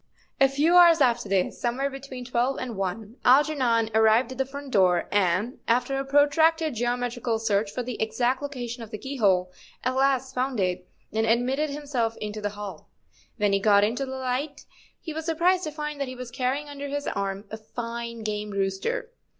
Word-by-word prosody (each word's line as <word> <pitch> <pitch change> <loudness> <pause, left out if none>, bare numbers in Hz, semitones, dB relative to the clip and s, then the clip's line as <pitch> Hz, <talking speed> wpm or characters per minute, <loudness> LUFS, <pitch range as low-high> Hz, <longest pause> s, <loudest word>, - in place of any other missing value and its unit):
A 270 - +7
few 305 +6 +3
hours 340 -2 +8
after 240 -6 +2
this, 190 -2 0
somewhere 250 +3 0
between 270 -2 -8
twelve 245 +2 0
and 245 -3 -5
one, 200 +5 -4
Algernon 250 -5 +3
arrived 220 +3 +4
at 260 - -8
the 265 - +1
front 280 0 -8
door, 180 -4 +3
and, 205 +4 +1
after 245 +3 +1
a - - -1
protracted 300 +3 +3
geometrical 240 0 -1
search 215 -2 0
for 250 +5 -4
the 245 -1 -5
exact 245 +4 0
location 250 -4 -5
of 225 - -8
the 215 - -5
keyhole, 200 -9 +1 0.3
at 255 - 0
last 265 -1 +1
found 255 -2 -1
it 180 -1 -1 0.3
and 220 +1 +1
admitted 255 +6 +1
himself 280 -6 -2
into 210 0 -5
the 205 - -1
hall. 205 -5 -8 0.5
When 205 -3 +2
he 195 - +3
got 205 0 +5
into 245 +6 0
the 265 0 -5
light 260 +3 -3 0.3
he 320 - -6
was 320 0 -5
surprised 350 +3 +2
to 310 - -3
find 300 -1 -5
that 275 - -1
he 255 - -7
was 250 -1 -8
carrying 260 +4 -1
under 285 0 -6
his 285 +1 -3
arm 195 +1 -3
a 220 - -5
fine 235 +1 -6
game 210 0 -3
rooster. 200 - -2
245 Hz, 190 wpm, -26 LUFS, 215-275 Hz, 0.5 s, hours